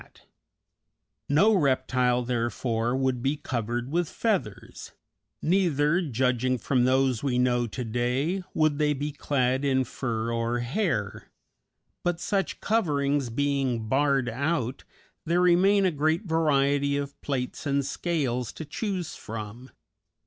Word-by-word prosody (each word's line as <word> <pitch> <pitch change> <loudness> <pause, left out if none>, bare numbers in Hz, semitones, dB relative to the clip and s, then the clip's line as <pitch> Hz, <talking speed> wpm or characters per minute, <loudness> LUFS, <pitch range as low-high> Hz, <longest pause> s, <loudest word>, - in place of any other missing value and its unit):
_ - - -13 1.2
No 195 +10 +5
reptile, 130 -5 +2
therefore, 120 0 -1
would 130 -2 0
be 135 +4 0
covered 120 0 -3
with 170 -1 0
feathers, 160 - -3 0.5
neither, 170 -2 +2
judging 130 -3 0
from 125 +2 +1
those 130 -2 +2
we 130 -3 0
know 120 -1 +2
to 125 +4 -5
day, 125 - -1
would 155 -2 +2
they 150 -1 +3
be 145 +2 -3
clad 135 -2 0
in 130 -2 +2
fur 115 -2 -3
or 115 +1 0
hair; 120 - -2 0.7
but, 175 -1 -1
such 195 +1 -2
coverings 145 - +1
being 130 -3 -1
barred 135 0 +2
out, 135 +1 -2 0.4
there 170 +2 +2
remain 190 +3 +4
a 185 - +3
great 155 +5 0
variety 140 -4 +2
of 140 0 -5
plates 135 +1 -3
and 140 -1 +1
scales 130 - -2
to 160 - -7
choose 185 +1 -3
from. 110 +3 -8
135 Hz, 125 wpm, -27 LUFS, 125-155 Hz, 1.2 s, No